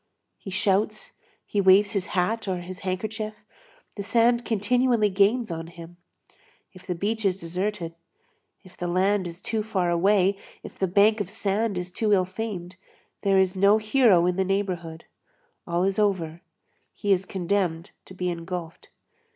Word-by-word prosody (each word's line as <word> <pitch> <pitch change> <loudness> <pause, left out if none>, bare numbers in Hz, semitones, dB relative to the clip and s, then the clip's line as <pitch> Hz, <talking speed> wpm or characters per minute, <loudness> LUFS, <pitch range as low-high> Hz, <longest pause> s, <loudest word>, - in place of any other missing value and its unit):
He 195 - -9
shouts, 200 +2 0 0.3
he 205 - 0
waves 195 +2 +5
his 195 -2 -2
hat, 215 +5 0
or 185 -2 -2
his 180 +1 -8
handkerchief, 215 +3 -4 0.6
the 205 - -6
sand 235 +3 +3
continually 230 0 +2
gains 205 +3 +2
on 165 0 -5
him; 170 0 -12 0.8
if 185 -1 -15
the 180 - -2
beach 215 +5 -2
is 190 -2 +1
deserted, 180 0 -3 0.7
if 180 -2 -17
the 175 - -4
land 185 +2 +1
is 170 0 -9
too 220 +1 -2
far 190 -5 -1
away, 195 +2 +3 0.2
if - - -11
the 190 - +1
bank 205 +4 +4
of 195 - -4
sand 205 0 -1
is 180 0 -4
too 210 +3 +1
ill 185 -2 +3
famed, 185 -2 -6 0.4
there 195 -1 +3
is 190 0 +2
no 200 +3 +5
hero 215 -5 +4
in 180 0 0
the 190 - +2
neighborhood, 180 -4 -3 0.6
all 170 +1 0
is 195 +1 0
over, 175 -5 0 0.5
he 205 - -1
is 185 0 0
condemned 180 -3 -1
to 185 - -13
be 180 0 -2
engulfed. 170 -1 -6
190 Hz, 160 wpm, -25 LUFS, 180-210 Hz, 0.8 s, waves